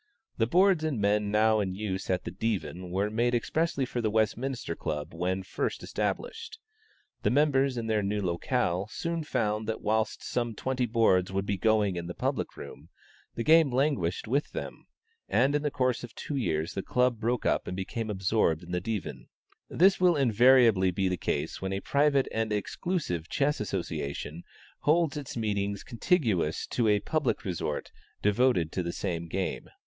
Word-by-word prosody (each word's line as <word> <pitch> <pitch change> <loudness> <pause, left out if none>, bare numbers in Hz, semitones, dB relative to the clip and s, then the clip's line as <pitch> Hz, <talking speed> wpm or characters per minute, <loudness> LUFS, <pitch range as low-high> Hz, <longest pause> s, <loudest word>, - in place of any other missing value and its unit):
The 115 - +3
boards 180 +3 +4
and 150 -7 -1
men 105 0 +2
now 110 +1 +3
in 95 -3 -1
use 95 -2 -4
at 95 -1 0
the - - -5
Divan 95 -3 -3
were 100 +4 -1
made 120 +2 +1
expressly 150 +3 0
for 125 -1 -3
the 110 - +1
Westminster 110 -1 -1
Club 75 -2 -4
when 90 +3 -1
first - - -3
established. 455 0 -3 0.6
The - - +2
members 135 -2 +2
in 115 - -2
their 110 -1 +1
new 105 +1 -1
locale 90 +1 0
soon 165 +5 -3
found 110 -6 -1
that 110 - -3
whilst 110 0 0
some 120 -2 -2
twenty 130 +2 -1
boards 105 -5 +3
would 95 0 -1
be 100 -1 -1
going 105 -2 +2
in 85 -1 -4
the 85 - -6
public - - -2
room, 70 - -10 0.5
the 115 - -2
game 160 0 +6
languished 125 - 0
with 140 +6 0
them; - - -6 0.4
and 135 +3 +3
in 150 - +1
the 150 - 0
course 130 -4 0
of 120 - -9
two 145 - -5
years 80 - -1
the 95 - -2
club 125 +2 +1
broke 120 +2 -1
up - - +1
and 90 - -4
became 110 +4 -4
absorbed 95 -4 +1
in 85 - -10
the 90 0 -1
Divan. 105 +1 -4 0.4
This 190 +3 +4
will 180 -2 +4
invariably 120 -6 +5
be 95 +2 0
the 90 -1 -1
case - - -2
when 95 0 -2
a 95 - -1
private 140 -1 +2
and 110 -1 -1
exclusive 105 - -2
chess 145 +1 +1
association 75 -5 -4 0.4
holds 160 -1 +2
its 140 -4 -6
meetings 100 -2 -1
contiguous 115 - 0
to 120 -3 +1
a 105 -1 +4
public 155 -7 -1
resort 85 -5 -3 0.3
devoted 105 -6 +2
to 95 - -1
the 85 -1 -3
same 85 -3 -3
game. 95 +2 -3
110 Hz, 175 wpm, -29 LUFS, 95-130 Hz, 0.6 s, game